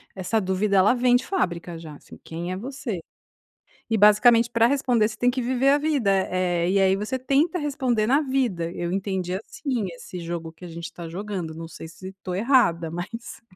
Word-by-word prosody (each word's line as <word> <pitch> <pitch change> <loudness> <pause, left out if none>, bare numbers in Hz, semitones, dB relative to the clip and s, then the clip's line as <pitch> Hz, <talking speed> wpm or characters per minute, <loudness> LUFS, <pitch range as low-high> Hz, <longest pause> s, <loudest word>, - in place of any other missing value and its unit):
essa 190 +4 0
dúvida 195 +1 +1
ela 190 +5 +5
vem 245 0 +3
de 245 - +1
fábrica 175 - -2
já, 160 -2 -9
assim, - - -14
quem 170 +2 -5
é 185 - -3
você? 240 -5 -5 0.9
E 225 - +2
basicamente 230 +3 +6
pra 230 -1 +4
responder 250 -5 +2
você 215 - -8
tem 245 - +3
que 255 +1 -2
viver 255 +2 +2
a 285 - +5
vida, 290 -8 +1 0.2
eh, 175 -2 +1
e 200 - +3
aí 190 0 +4
você 215 +6 -3
tenta 285 +8 +1
responder 260 -7 0
na 275 +5 +4
vida, 245 - -1
eu 175 -1 -3
entendi, 190 -1 -2
assim, 225 +3 -3
esse 180 +2 -9
jogo 170 -1 -5
que 170 - -17
a - - -7
gente 170 0 -7
tá 170 -1 -7
jogando 185 -2 -5
não 165 +1 -7
sei 165 - -9
se 185 +4 -10
tô 180 - -4
errada, 195 - +3
mas. 195 +8 -7
205 Hz, 200 wpm, -24 LUFS, 175-250 Hz, 0.9 s, basicamente